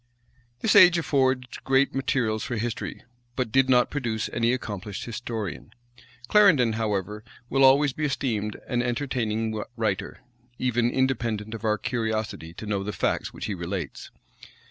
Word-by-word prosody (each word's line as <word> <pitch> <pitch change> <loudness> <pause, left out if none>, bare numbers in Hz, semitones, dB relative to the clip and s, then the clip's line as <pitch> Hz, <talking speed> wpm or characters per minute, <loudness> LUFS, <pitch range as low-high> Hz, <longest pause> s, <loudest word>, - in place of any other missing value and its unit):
This 225 - +2
age 180 -3 +8
affords 130 -5 0
great 135 +1 +2
materials 125 -5 0
for 120 - -3
history; 115 +1 -4 0.3
but 125 -4 -2
did 135 +1 +3
not 125 -1 +4
produce 115 -7 -2
any 115 +1 +2
accomplished 105 -5 -4
historian. 110 -6 -5 0.5
Clarendon, 155 - +5
however, 105 -1 -2 0.3
will 135 +1 +3
always 135 +1 +5
be 150 - -2
esteemed 115 -7 -2
an 120 -1 0
entertaining 115 -4 -1
writer, 110 -1 -2 0.4
even 120 -1 +1
independent 115 -5 -1
of 115 - -7
our 110 -1 +2
curiosity 110 -8 -3
to 85 - -9
know 100 -2 -1
the 105 - -3
facts - - -1
which - - -7
he 105 - -2
relates. 85 -3 -5
115 Hz, 145 wpm, -26 LUFS, 110-130 Hz, 0.5 s, age